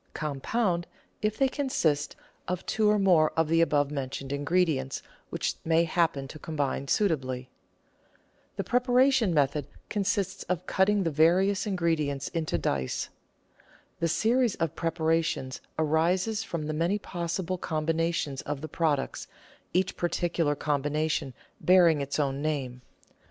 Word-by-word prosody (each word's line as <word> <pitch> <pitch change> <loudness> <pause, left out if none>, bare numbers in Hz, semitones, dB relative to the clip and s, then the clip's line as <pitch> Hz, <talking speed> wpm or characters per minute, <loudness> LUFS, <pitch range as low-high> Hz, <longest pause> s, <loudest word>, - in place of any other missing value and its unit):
Compound 170 - -1 0.3
if 215 0 0
they 270 - +4
consist 170 - 0 0.3
of 180 0 -3
two 215 -1 +2
or 210 - +4
more 175 -6 +4
of 160 -1 +2
the 165 0 +4
above 145 -3 +2
mentioned 135 -1 -4
ingredients 145 -2 0 0.3
which - - -1
may 165 +1 +3
happen 165 -4 0
to 155 - -10
combine 145 -3 -2
suitably. 130 -9 0 1.0
The - - -2
preparatory 250 -2 +3
method 145 -1 +1 0.2
consists 200 -2 -1
in 180 - +2
cutting 200 +1 +2
the 165 - 0
various 185 +7 +3
in 195 -2 -1
gredients 150 -5 0
into 165 -2 -1
dice. 65 -2 -2 0.9
The 170 - +1
series 230 +6 +2
of 165 -3 -1
preparations 160 -5 -1 0.2
arises 175 +8 +1
from 170 -7 -4
the 155 - -2
many 170 +6 +1
possible 180 -1 -3
com 155 -2 -2
binations 165 -4 0
of 145 -2 -4
the 155 - -5
products, 155 -4 -1 0.4
each 185 +1 0
particular 170 -3 0
combination 150 -1 -1 0.3
bearing 170 -3 +5
its 140 +2 -3
own 140 -1 0
name. 135 -5 -2
165 Hz, 135 wpm, -28 LUFS, 145-185 Hz, 1.0 s, bearing